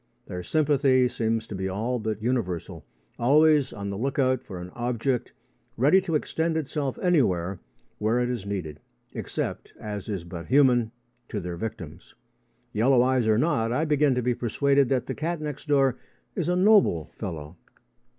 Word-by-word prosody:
Their 90 - -6
sympathy 140 - +3
seems 115 -2 -1
to 110 - -8
be 95 0 -3
all 115 +6 -2
but 110 -1 -3
universal, 90 - -2 0.4
always 150 +3 +4
on 100 -1 -5
the 100 - -4
look 135 +3 -2
out 130 -2 +2
for 95 -4 -8
an 90 +1 -8
object, 120 +2 -2 0.5
ready 150 +10 +5
to 175 -4 -2
extend 160 +2 0
itself 145 -3 -2
anywhere 95 - +2 0.4
where 110 +3 +1
it 125 - +1
is 120 -5 -3
needed, 90 -7 -5 0.3
except, - - -4
as 105 -1 -6
is 95 -5 -3
but 85 -1 -8
human, 125 -5 +4 0.4
to 105 - -3
their 90 -2 -5
victims. 85 -4 -7 0.6
Yellow 120 +3 +4
eyes 130 -3 +2
or 110 -1 +4
not, 115 -5 +1
I 150 +6 +1
begin 150 -3 +3
to 125 - -1
be 125 +1 +2
persuaded 135 +3 +2
that 130 -3 +1
the - - -3
cat 165 +2 -3
next 150 0 -6
door 135 -3 +3 0.4
is - - -1
a 180 - +2
noble 185 - +4
fellow. 80 -5 -6
120 Hz, 170 wpm, -26 LUFS, 100-140 Hz, 0.6 s, ready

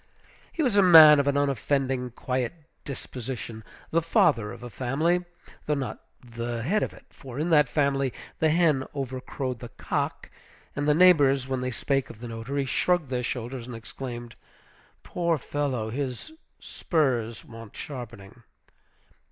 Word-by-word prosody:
He 325 - -1
was 245 -7 +1
a - - +8
man 160 -5 +9
of 140 - +1
an 140 0 +2
unoffending, 135 -1 0
quiet 125 +3 -3 0.3
disposition; 125 -4 -6 0.3
the 165 - +3
father 115 -9 +2
of - - -10
a 120 - -6
family, 155 +10 0 0.4
though 150 - +2
not 135 -3 -4 0.3
the 115 0 -4
head 205 - +1
of - - -1
it, - - -16
for 130 -2 -10
in 160 +4 -1
that 150 -4 +5
family 140 -3 +1 0.3
"the 160 - +3
hen 155 -4 +3
over 130 -2 -4
crowed 130 -2 -4
the 120 -1 -8
cock," - - -3 0.4
and 145 +1 -1
the 150 - +4
neighbors, 145 -7 +5
when 130 -1 -2
they 125 - -1
spake 135 +2 -1
of 110 - -11
the 120 - -7
notary, 120 +5 -3
shrugged 170 +2 +1
their 125 -1 0
shoulders, 125 0 -4
and 125 - -7
exclaimed, 120 +1 -7 0.7
"Poor 170 -2 0
fellow! 130 -6 -2
his 130 - -4 0.3
spurs 125 -9 -1
want 115 -2 -12
sharpening." 120 -5 -9
135 Hz, 155 wpm, -26 LUFS, 120-150 Hz, 0.7 s, man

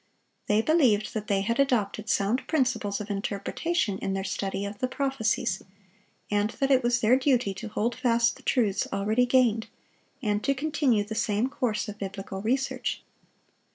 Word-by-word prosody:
They 210 +1 +3
believed 250 -10 +3
that 215 -2 -4
they 195 -1 +1
had 230 +5 -1
adopted 220 -5 +1
sound 205 +6 +1
principles 250 -9 0
of 210 0 -5
interpretation 205 - -1
in 195 - -2
their 195 0 -2
study 195 +1 -3
of 200 0 -7
the 255 - 0
prophecies, 255 -6 -1 0.7
and 205 0 +2
that 270 +4 -1
it 260 -1 +5
was 240 0 +1
their 230 +3 +5
duty 255 -6 +2
to 220 +4 -7
hold 220 +2 -1
fast 235 -2 +2
the - - -15
truths 210 -7 +1
already 215 +5 +1
gained, 240 -3 +3 0.5
and 210 -5 -1
to 275 - +1
continue 280 -6 +1
the 215 +2 -6
same 215 +2 0
course 230 -5 -1
of 210 0 -8
biblical 195 0 -5
research. 260 +5 -1
220 Hz, 165 wpm, -27 LUFS, 205-255 Hz, 0.7 s, it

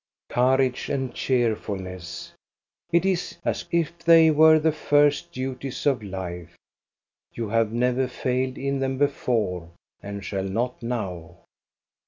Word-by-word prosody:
Courage 130 +1 +2
and 135 -3 -2
cheerfulness! 95 -8 -2 0.6
It 170 +2 +3
is 185 -3 -1
as - - -1
if 170 0 0
they 165 -1 +6
were 155 +1 +7
the 160 +1 +2
first 145 -1 +2
duties 130 0 -5
of 135 -5 +2
life. 90 -4 -7 0.8
You 115 -3 -3
have 115 0 +1
never 125 +2 +1
failed 130 +1 -2
in 140 0 -2
them 135 0 -1
before, 115 - 0 0.3
and 100 0 -7
shall 95 -2 -2
not 120 +6 -2
now. 100 -9 -5
125 Hz, 125 wpm, -25 LUFS, 100-140 Hz, 0.8 s, were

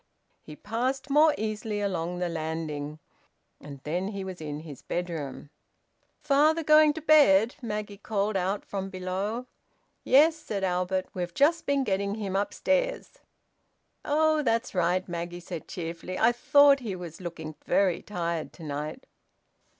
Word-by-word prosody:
He 150 - -11
passed 255 - -2
more 305 +2 +5
easily 215 0 -3
along 180 -3 -2
the 180 0 -1
landing. 155 -2 -4 0.6
And 140 -2 -10
then 175 +5 -2
he 200 -2 -4
was 185 -3 -7
in 150 -1 -5
his 150 -5 -10
bedroom. 165 -5 -5 0.7
"Father 305 +3 +3
going 305 0 +6
to 320 0 -7
bed?" 250 -8 +5
Maggie 210 -3 -5
called 205 0 -1
out 190 +2 -1
from 195 -1 -4
below. 195 +5 -3 0.6
"Yes," 300 +5 +5
said 215 -11 -5
Albert. 185 0 0
"We've 175 -1 -4
just 325 +4 +3
been 280 -1 +2
getting 200 -2 -1
him 200 -3 -4
upstairs." - - -1 0.8
"Oh! 310 +1 +2
That's 230 -2 0
right," 180 0 +1
Maggie 175 0 -5
said 170 -2 -7
cheerfully. 170 +1 -5
"I 230 - +5
thought 280 +3 +5
he 220 -7 -4
was 175 -1 -9
looking 170 -3 -6
very 190 -4 +2
tired 170 -5 -3
to 170 - -12
night." 150 - -5
195 Hz, 140 wpm, -27 LUFS, 175-255 Hz, 0.8 s, going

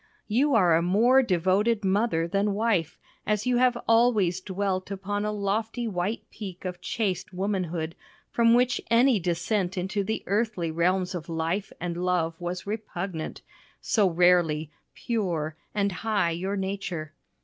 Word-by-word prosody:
You 260 +5 +2
are 180 -6 +5
a 165 - +3
more 225 +9 +4
devoted 205 +2 +1
mother 190 -4 +1
than 200 +3 0
wife, 205 -7 0 0.3
as 210 0 0
you 250 -1 +2
have 250 -1 +3
always 220 -6 +3
dwelt 190 -1 -2
upon 205 +1 -3
a 210 - 0
lofty 220 +4 -2
white 190 +2 -2
peak 190 -4 -8
of 180 -1 -5
chaste 195 -4 -2
womanhood, 180 -4 -2 0.4
from 230 0 +4
which 250 0 +2
any 235 0 +4
descent 180 +2 -1
into 190 +3 -1
the 220 +3 -3
earthly 205 -5 0
realms 180 +3 +1
of 170 -2 -6
life 165 +5 -2
and 175 +1 -3
love 175 -2 +1
was 175 +1 -4
repugnant 195 -5 -5 0.4
so 205 -4 +2
rarely 165 -3 +3 0.2
"pure" 175 -9 -2 0.2
and 200 -1 +1
high 205 -3 0
your 190 +4 -2
nature. 190 -5 -4
190 Hz, 145 wpm, -26 LUFS, 175-215 Hz, 0.4 s, are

